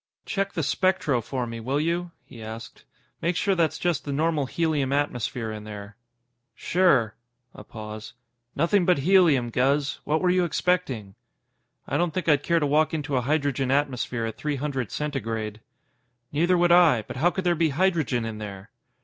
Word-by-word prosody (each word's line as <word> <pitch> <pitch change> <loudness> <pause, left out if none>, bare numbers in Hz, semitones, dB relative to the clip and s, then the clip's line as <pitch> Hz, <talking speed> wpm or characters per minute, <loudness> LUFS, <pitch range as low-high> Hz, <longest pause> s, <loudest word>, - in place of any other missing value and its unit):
"Check 195 -1 -2
the 165 - -1
spectro 145 -4 +1
for 125 +2 -3
me, 115 -1 -6
will 130 +5 -1
you?" 170 +3 -1 0.2
he 120 -4 -12
asked. 110 +1 -9 0.4
"Make 170 +2 0
sure 200 +2 +1
that's 165 -3 +1
just 170 -5 -1
the 145 - -4
normal 150 -1 0
helium 150 -4 0
atmosphere 125 -5 -1
in 105 -1 -7
there." 105 -1 -9 0.6
"Sure." 140 - +2 0.4
A - - -11
pause. 110 0 -9 0.4
"Nothing 175 +6 +2
but 180 -1 +3
helium, 165 -11 +4
Guz. 140 +3 +1
What 155 +1 +1
were 180 -1 +2
you 180 0 +3
expecting?" 155 - -1 0.7
"I - - 0
don't 175 -2 0
think 185 - -2
I'd 145 -3 +4
care 170 +2 +2
to 150 - 0
walk 155 +2 +2
into 145 -2 -2
a 125 - +2
hydrogen 140 -1 0
atmosphere 130 -4 0
at 110 - -5
three 150 -1 -2
hundred 135 -5 -3
Centigrade." 115 -7 -3 0.7
"Neither 175 +5 +2
would 175 0 +3
I, 165 -10 +5
but - - -8
how 165 +6 +3
could 190 +1 -4
there 175 -1 +3
be 165 -1 +1
hydrogen 150 -7 +1
in 110 -1 -5
there?" 100 0 -8
145 Hz, 175 wpm, -25 LUFS, 120-170 Hz, 0.7 s, I